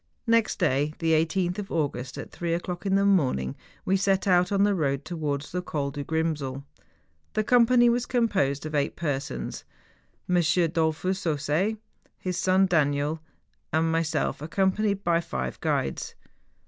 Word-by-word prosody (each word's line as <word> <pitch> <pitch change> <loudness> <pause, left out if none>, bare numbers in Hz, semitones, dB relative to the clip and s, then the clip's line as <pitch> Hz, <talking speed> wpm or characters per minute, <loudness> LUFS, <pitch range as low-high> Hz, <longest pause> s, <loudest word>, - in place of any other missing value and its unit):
Next 230 -1 +2
day, 145 +4 +1
the 165 -1 0
18th 175 +4 +1
of 200 - -6
August, 135 -5 -2
at - - -7
three 170 -1 -2
o'clock 175 +2 -4
in 195 - +2
the 200 0 +3
morning, 130 - +2 0.3
we 190 - +2
set 195 0 +1
out 180 -1 +3
on 200 0 +3
the 205 0 +3
road 140 -5 -1
towards 150 -4 -3
the 180 - -2
Col 145 -5 -3
du 145 +1 -5
Grimsel. 150 -4 -2 0.7
The 215 - +1
company 240 +1 +5
was 240 +1 +1
composed 195 - +1
of 155 - -5
eight 145 -1 0
persons, 135 - -3 0.6
IM. 180 - +2 0.3
Dollfus 165 +3 0
Ausset, 155 +8 0 0.4
his 185 -1 -3
son 185 +1 +3
Daniel, 150 -2 +1 0.5
and 160 +1 +2
myself, 165 -3 0
accompanied 195 +5 0
by 170 -1 +2
five 65 - -4
guides. 70 - -2
165 Hz, 150 wpm, -26 LUFS, 145-195 Hz, 0.7 s, company